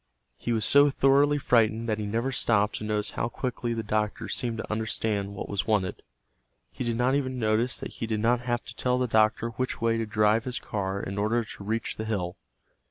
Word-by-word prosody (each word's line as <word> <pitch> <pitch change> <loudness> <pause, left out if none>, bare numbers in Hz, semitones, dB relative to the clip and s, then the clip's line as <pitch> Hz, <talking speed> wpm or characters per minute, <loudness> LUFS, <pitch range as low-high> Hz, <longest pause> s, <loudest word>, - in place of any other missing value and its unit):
He 120 - -4
was 110 -2 +1
so 145 +1 +6
thoroughly 140 +2 +4
frightened 115 -4 +2
that 110 -1 0
he 105 - -3
never 115 +5 -1
stopped 105 -4 +2
to - - -6
notice 105 -1 0
how - - -2
quickly 120 -1 -3
the 115 - -3
doctor 105 0 -1
seemed 120 -2 -2
to 110 - -5
understand 105 -2 -1
what - - -5
was 100 +1 -2
wanted. 100 -4 0 0.7
He - - -5
did 115 -1 -1
not 125 +2 +2
even 130 -2 -1
notice 115 +2 +1
that - - -6
he 115 - -4
did 110 -1 -1
not 120 +3 +3
have 120 -1 -2
to 120 - -9
tell 125 0 +1
the 125 - +1
doctor 110 0 +2
which 130 +3 -3
way 115 0 +1
to 115 - -2
drive 110 0 +2
his 125 -1 -3
car 100 -1 -3
in 100 +1 -4
order 115 +3 +1
to 100 - -10
reach 110 +2 -2
the 110 - -4
hill. 95 -5 -2
115 Hz, 220 wpm, -27 LUFS, 105-120 Hz, 0.7 s, so